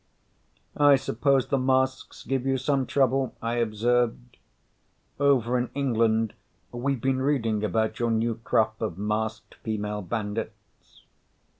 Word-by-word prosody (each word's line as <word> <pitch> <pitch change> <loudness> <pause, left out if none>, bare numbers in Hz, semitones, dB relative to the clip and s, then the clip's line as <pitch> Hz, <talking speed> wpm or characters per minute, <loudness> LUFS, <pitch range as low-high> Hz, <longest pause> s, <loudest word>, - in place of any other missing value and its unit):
"I 145 -1 +6
suppose 135 +1 +1
the 140 - +1
masks 130 0 0
give 135 -2 -1
you 135 0 +2
some 135 0 0
trouble," 135 -1 +1
I 115 +1 -2
observed. 120 +2 0 0.8
"Over 125 -4 +3
in 125 - -2
England 115 -5 +1 0.4
we've 130 +2 -2
been 130 +2 0
reading 115 -7 0
about 110 +2 0
your 120 -1 +1
new 115 +1 +1
crop 110 0 +1
of 105 -7 -3
masked 110 +2 -3
female 105 -1 -3
bandits." 105 0 -6
120 Hz, 125 wpm, -26 LUFS, 110-130 Hz, 0.8 s, I